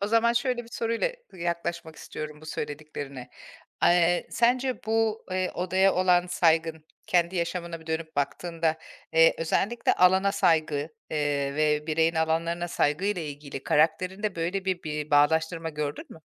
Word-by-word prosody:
o 200 - 0
zaman 230 +2 +3
şöyle 240 0 0
bir - - -16
soruyla 230 - 0 0.2
yaklaşmak 170 -2 -4
istiyorum 150 0 -7
bu 155 - -13
söylediklerine. 145 -4 -6 0.5
Eee, 175 0 +4
sence 250 +2 +1
bu, 225 0 0
eee, 185 0 -1
odaya 185 +2 +2
olan 180 -1 +3
saygın, 160 -2 +1 0.2
kendi 175 +1 +1
yaşamına 170 -1 -3
bir 160 - -17
dönüp 160 -1 -4
baktığında, 160 +3 -1 0.3
eee, 165 0 +6
özellikle 200 +8 +1
alana 190 +2 +4
saygı, 155 -5 +1 0.2
eee, 145 -2 -1
ve 150 0 +1
bireyin 165 +1 +2
alanlarına 165 +2 0
saygıyla 175 +6 0
ilgili 145 -2 -7
karakterinde 185 +6 +1
böyle 180 +4 -2
bir 185 -2 -1
bir 150 -1 -4
bağdaştırma 160 +3 +2
gördün 150 -1 -4
mü? 160 - -13
165 Hz, 140 wpm, -27 LUFS, 155-185 Hz, 0.5 s, eee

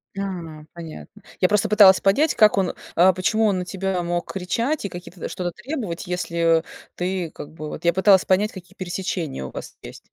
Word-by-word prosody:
Да. 170 -6 -5
Понятно. 170 +5 -10 0.2
Я 185 - +4
просто 210 +1 +1
пыталась 200 -3 +7
понять, 275 +11 +3
как 215 -1 +5
он, 190 -2 +1 0.2
а 185 +2 +6
почему 215 +5 +1
он 200 -3 +2
на 180 - -4
тебя 190 -1 -2
мог 175 0 -3
кричать 230 +10 -1
и - - -2
какие-то, 175 0 -8
что-то 180 -1 -3
требовать, 210 - -5
если, 170 -2 +1
э, - - -10 0.3
ты, 180 -1 -2
как 145 - -10
бы, 155 -1 -7
вот - - -8
Я 170 - +4
пыталась 190 0 +5
понять, 200 +3 +2
какие 190 0 -12
пересечения 175 - -4
у 65 - -8
вас - - -9
есть. - - -10
185 Hz, 195 wpm, -23 LUFS, 170-200 Hz, 0.3 s, пыталась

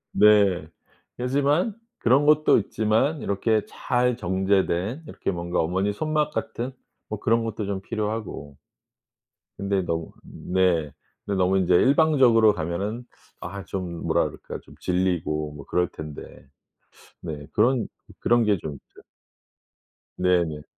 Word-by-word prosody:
네. 100 -6 +5 0.5
그렇지만 145 - +1 0.2
그런 130 +5 +3
것도 155 0 +5
있지만 110 +9 0
이렇게 105 +2 +1
잘 125 0 0
정제된 95 - 0
이렇게 - - -3
뭔가 85 0 -2
어머니 95 +5 +1
손맛 150 +5 -1
같은 125 +3 -3 0.4
뭐 110 -1 -4
그런 115 +2 +2
것도 110 -2 -3
좀 95 -1 -3
필요하고 105 -10 -4 1.0
근데 100 -1 0
너무 80 -1 -3
네 90 -5 0 0.3
근데 100 -1 -1
너무 95 +1 +3
이제 90 -1 +3
일방적으로 130 - +5
가면은 100 +7 -3 0.4
아 100 0 -6
좀 90 -3 -5
뭐라 - - +2
그럴까 - - -7
좀 - - -16
질리고 85 -5 -1
뭐 75 -2 -10
그럴 90 0 +1
텐데. 75 -2 -8 1.0
네 75 -4 -6
그런, 120 +2 +2 0.3
그런 120 -1 +3
게 105 -2 +3
좀 80 -2 -6
있죠. - - -17 1.2
네네. 85 -5 +1
100 Hz, 250 characters per minute, -25 LUFS, 90-120 Hz, 1.2 s, 네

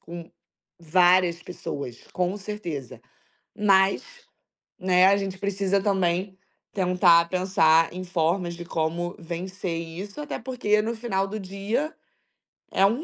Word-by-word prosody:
com 170 0 -9 0.5
várias 175 +1 +3
pessoas, 140 -8 -6
com 180 +2 -1
certeza, 180 - -6 0.6
mas, 195 -2 +4 0.8
né, 185 0 +4
a 200 +1 +5
gente 195 -1 -4
precisa 200 0 0
também 190 -1 0 0.4
tentar 180 -3 +4
pensar 165 -3 +3
em 185 +1 -6
formas 175 0 0
de 175 0 -8
como 170 +1 -2
vencer 175 +1 -5
isso, 180 - -7
até 295 - -5
porque 230 -4 0
no 230 +2 -2
final 195 -4 -1
do 210 +2 -5
dia, 200 +10 -3 0.8
é 195 - +4
um 235 +10 +1
185 Hz, 125 wpm, -25 LUFS, 170-200 Hz, 0.8 s, a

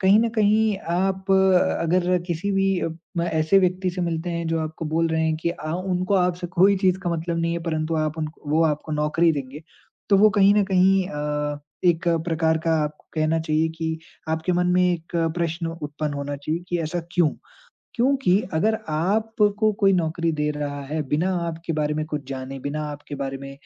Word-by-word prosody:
कहीं 195 +3 +5
न 235 - +2
कहीं 215 -1 +2 0.2
आप 190 +1 -1
अ, 190 -1 +4
अगर 180 +2 +2
किसी 175 +3 -2
भी 195 0 +2
अ, - - -1 0.3
मैं 170 - 0
ऐसे 160 +4 +4
व्यक्ति 185 0 +1
से 180 - -5
मिलते 170 0 -2
हैं 170 0 -3
जो 165 - 0
आपको 160 +1 -5
बोल 165 +2 +1
रहे 160 0 0
हैं 160 -1 +1
कि 170 - +1
आ 155 -1 -5
उनको 185 +1 -1
आप 180 -2 +3
से 175 - -3
कोई 195 +3 +5
चीज़ 185 -1 +2
का 175 - -1
मतलब 170 0 -2
नहीं 170 0 0
है 170 - -1
परंतु 160 -1 -2
आप 155 0 -1
उनको 155 -1 -6
वो 160 +2 +3
आपको 155 0 -1
नौकरी 150 +3 +2
देंगे, 140 +1 -6 0.5
तो 200 - +5
वो 215 +1 +6
कहीं 200 -1 +5
न 210 - +3
कहीं 190 0 +3
अ, 150 -2 -2 0.3
एक 170 -1 +2 0.2
प्रकार 160 -1 +1
का 165 - +1
आपको 150 0 -8
कहना 155 0 +1
चाहिए 160 0 +1
कि 160 0 -2 0.3
आपके 160 +3 0
मन 180 0 +1
में 180 - +4
एक 170 0 -5 0.2
प्रश्न 170 0 -1 0.2
उत्पन्न 150 0 -3
होना 140 0 -4
चाहिए 155 +5 -3
कि 175 - 0
ऐसा 165 +3 -2
क्यों? 170 -4 +3 0.6
क्योंकि 250 -7 +3 0.2
अगर 215 +7 +2
आपको 210 +5 +1
कोई 195 -1 +5
नौकरी 165 -1 0
दे 150 -1 -1
रहा 145 -1 -4
है 155 +2 -2
बिना 165 +7 +1 0.2
आपके 165 0 -4
बारे 150 -1 0
में 155 0 -1
कुछ 150 -2 -4
जाने 135 0 -5
बिना 145 +3 -3
आपके 145 0 -8
बारे 135 -1 -3
में 135 0 -8
165 Hz, 205 wpm, -23 LUFS, 155-185 Hz, 0.6 s, वो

